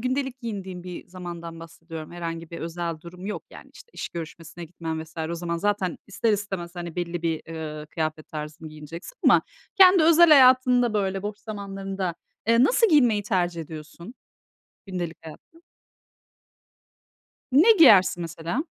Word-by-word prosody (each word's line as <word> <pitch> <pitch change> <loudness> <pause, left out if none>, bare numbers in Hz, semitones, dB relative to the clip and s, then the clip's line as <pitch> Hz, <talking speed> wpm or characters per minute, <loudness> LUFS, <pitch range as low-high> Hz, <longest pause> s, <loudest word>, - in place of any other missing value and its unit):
gündelik 260 +1 -2
giyindiğin 190 -6 -6
bir 180 -1 -8
zamandan 170 -2 -8
bahsediyorum. 165 -1 -10
Herhangi 165 -1 -6
bir 170 - -7
özel 170 -1 -4
durum 180 +3 -10
yok, 210 - -4
yani, - - -13
işte, - - -15
iş - - -5
görüşmesine 170 0 -8
gitmen 160 -1 -5
vs. 160 - -20 0.2
o - - -2
zaman 170 0 -3
zaten 200 -1 -1
ister 215 +3 0
istemez, 190 -4 -4
hani, 175 -1 -7
belli 175 -1 -3
bir, 165 -2 -1
eee, 155 -2 -6
kıyafet 155 -1 -3
tarzını 155 +1 -7
giyineceksin 155 - -10
ama - - +6 0.3
kendi 375 -3 +7
özel 335 +1 +7
hayatında, 255 -4 +6
böyle 195 -2 -1
boş 210 0 -5
zamanlarında, 195 -4 -5 0.3
eee, 230 +2 +5
nasıl 460 - +4
giyinmeyi 245 - +4
tercih 175 -4 -1
ediyorsun 160 - -10 0.7
gündelik 175 -3 -4
hayatta? 320 - -13 1.9
Ne 335 - +7
giyersin 190 - +7
mesela? 170 - -3
180 Hz, 145 wpm, -25 LUFS, 165-215 Hz, 1.9 s, kendi